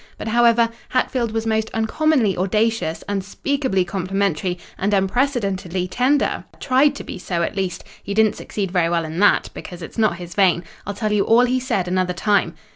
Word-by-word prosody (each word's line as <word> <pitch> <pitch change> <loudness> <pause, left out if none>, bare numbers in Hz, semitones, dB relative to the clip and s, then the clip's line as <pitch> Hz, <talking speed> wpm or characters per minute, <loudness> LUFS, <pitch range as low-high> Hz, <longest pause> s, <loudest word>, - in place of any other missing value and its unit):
But, 220 - -5
however, 235 0 +4 0.2
Hatfield 250 -2 0
was 225 0 -2
most 220 0 0
uncommonly 225 - +2
audacious, 210 -2 0
unspeakably 200 +2 -1
complimentary, 185 -1 -1 0.2
and 200 +2 0
unprecedentedly 195 -4 0
tender—tried 270 +2 +1
to - - -7
be - - -7
so, 175 -2 -2
at 200 - -3
least—he 195 +1 -5
didn't 220 -1 +4
succeed 195 -4 -4
very 175 -3 +2
well 170 -1 0
in 160 +2 -5
that, 205 - +3
because 175 -2 -9
it's 165 - -7
not 215 -6 +2
his 175 -1 -8
vein. 180 -3 +3 0.2
I'll 205 - -3
tell 215 0 -2
you 205 -1 +3
all 235 +2 +5
he 255 +1 +1
said 200 -8 -1
another 180 0 0
time." 205 +3 +1
200 Hz, 170 wpm, -21 LUFS, 185-230 Hz, 0.2 s, all